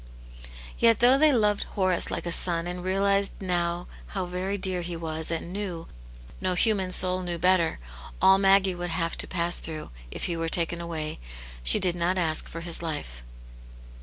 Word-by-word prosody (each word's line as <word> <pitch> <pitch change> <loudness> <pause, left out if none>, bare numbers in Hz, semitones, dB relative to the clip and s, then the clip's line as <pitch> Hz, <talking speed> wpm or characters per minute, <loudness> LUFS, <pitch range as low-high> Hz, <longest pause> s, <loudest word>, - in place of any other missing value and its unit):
Yet 230 -2 +4
though 250 +3 +5
she 310 0 +5
loved 210 -5 +2 0.2
Horace 185 -3 +1
like - - -4
a 170 - -2
son, 170 -1 +2
and 180 0 -5
realized 195 +1 +1
now 175 -2 -1 0.2
how 190 -3 -3
very 185 +3 -3
dear 185 -2 -1
he 175 0 -5
was, 160 -1 -4
and 170 +1 -4
knew— 185 -5 -5 0.6
no 185 -1 0
human 195 -2 +2
soul 185 0 +2
knew 175 -1 -3
better 180 -1 +2 0.2
— 60 - -14
all 190 +1 +6
Maggie 195 -1 +4
would 175 0 -5
have 165 0 -1
to - - -2
pass 175 -1 0
through, 155 -1 -7 0.2
if - - -7
he 170 - -2
were 165 0 -2
taken 170 0 0
away, 160 -2 -5 0.4
she - - +4
did 180 - +2
not 175 +2 0
ask 160 -3 +1
for 165 - -8
his 170 -1 0
life. 65 - -5
180 Hz, 185 wpm, -26 LUFS, 170-190 Hz, 0.6 s, all